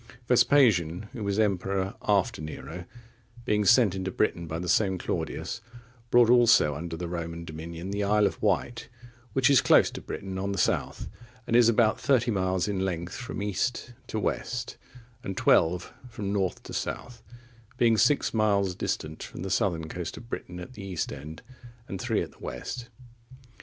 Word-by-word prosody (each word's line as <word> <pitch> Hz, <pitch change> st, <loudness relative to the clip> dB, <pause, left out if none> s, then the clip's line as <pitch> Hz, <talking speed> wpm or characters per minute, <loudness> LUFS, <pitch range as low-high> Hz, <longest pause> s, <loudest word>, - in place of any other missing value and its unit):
Vespasian,(40) 110 Hz, -, +3 dB
who 115 Hz, -, -6 dB
was 100 Hz, 0 st, -1 dB
emperor 95 Hz, -2 st, 0 dB
after 100 Hz, -6 st, +1 dB
Nero, 80 Hz, +3 st, -7 dB, 0.6 s
being 105 Hz, -3 st, +2 dB
sent 120 Hz, -4 st, +5 dB
into 95 Hz, -1 st, -3 dB
Britain 85 Hz, -4 st, -1 dB
by 80 Hz, +1 st, -3 dB
the 90 Hz, +2 st, -4 dB
same 95 Hz, +1 st, +2 dB
Claudius, -, -, -4 dB, 0.5 s
brought 120 Hz, -1 st, +6 dB
also 115 Hz, -10 st, +5 dB
under 80 Hz, +3 st, -5 dB
the 90 Hz, +1 st, -4 dB
Roman 85 Hz, -1 st, -5 dB
dominion 85 Hz, +3 st, -7 dB
the 100 Hz, 0 st, -1 dB
Isle 105 Hz, +1 st, +3 dB
of -, -, -2 dB
Wight, 110 Hz, +3 st, 0 dB, 0.4 s
which 130 Hz, -2 st, +3 dB
is 140 Hz, -3 st, +6 dB
close -, -, +5 dB
to -, -, -7 dB
Britain 95 Hz, -1 st, -6 dB
on 100 Hz, +1 st, -2 dB
the -, -, -4 dB
south, -, -, 0 dB, 0.4 s
and 115 Hz, -, 0 dB
is 120 Hz, -1 st, +7 dB
about 115 Hz, -1 st, +3 dB
thirty 125 Hz, -4 st, +2 dB
miles 95 Hz, -2 st, 0 dB
in 100 Hz, -2 st, -1 dB
length 85 Hz, -2 st, -3 dB
from 115 Hz, -4 st, -5 dB
east 120 Hz, +5 st, -2 dB
to 110 Hz, -, -3 dB
west, 120 Hz, +3 st, -3 dB, 0.5 s
and 95 Hz, -1 st, -5 dB
twelve 85 Hz, +1 st, +3 dB, 0.2 s
from 100 Hz, -4 st, -4 dB
north 95 Hz, -3 st, -1 dB
to -, -, -9 dB
south; 120 Hz, -1 st, -4 dB, 0.6 s
being 115 Hz, -2 st, +4 dB
six 145 Hz, +6 st, +3 dB
miles 100 Hz, -4 st, +2 dB
distant 80 Hz, -2 st, -3 dB
from -, -, -7 dB
the 95 Hz, -, -4 dB
southern 85 Hz, -6 st, 0 dB
coast 90 Hz, +1 st, -5 dB
of 115 Hz, +1 st, -12 dB
Britain 90 Hz, -6 st, -6 dB
at 90 Hz, +7 st, -9 dB
the 105 Hz, -, -9 dB
east 90 Hz, -4 st, -3 dB
end, 75 Hz, +3 st, -9 dB, 0.4 s
and 95 Hz, -, -5 dB
three -, -, 0 dB
at -, -, -9 dB
the -, -, -23 dB
west. 115 Hz, -, -6 dB
100 Hz, 175 wpm, -27 LUFS, 85-115 Hz, 0.6 s, is